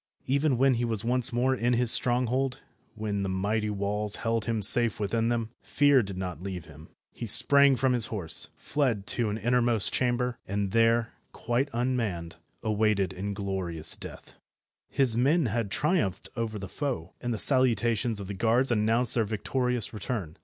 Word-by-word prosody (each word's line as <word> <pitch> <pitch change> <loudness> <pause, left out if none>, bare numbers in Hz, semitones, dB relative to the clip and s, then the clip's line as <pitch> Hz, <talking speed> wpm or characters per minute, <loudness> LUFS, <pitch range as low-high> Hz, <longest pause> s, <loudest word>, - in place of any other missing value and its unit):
Even 140 0 +1
when 135 +1 +3
he 120 0 -1
was 115 -3 -3
once 125 +1 +1
more 125 +2 +1
in 120 -1 0
his 120 -1 +4
stronghold, 125 +1 +3 0.4
when 105 -2 -3
the 95 - -2
mighty 105 +3 -1
walls 105 +1 -2
held 115 -1 -2
him 115 -3 -2
safe 115 +2 +5
within 115 +3 -1
them, 115 -2 -2
fear 145 -2 +3
did 100 -3 -7
not 90 -4 -5
leave 90 -3 -6
him. 80 0 -15 0.2
He 115 - -7
sprang 140 +5 +5
from 130 +1 +1
his 120 -2 +4
horse, 90 -8 -2
fled 125 -9 -1
to 115 -1 -1
an 105 - -3
innermost 120 -1 +2
chamber, 125 -1 -1
and 100 0 -2
there, 115 +1 +2 0.2
quite 125 +4 -2
unmanned, 115 -9 -3 0.3
awaited 105 -3 0
inglorious 95 -4 -1
death. - - -11 0.6
His 130 -5 +1
men 140 +7 +2
had 115 -2 -2
triumphed 135 - -1
over 115 -2 -3
the 95 -1 -7
foe, 120 - -5
and 120 - -3
the 115 - -2
salutations 120 -3 +2
of 100 - -6
the 100 - -6
guards 115 +6 +1
announced 115 +2 +1
their 115 - +2
victorious 120 +3 -2
return. 100 -6 -5
115 Hz, 165 wpm, -27 LUFS, 100-125 Hz, 0.6 s, safe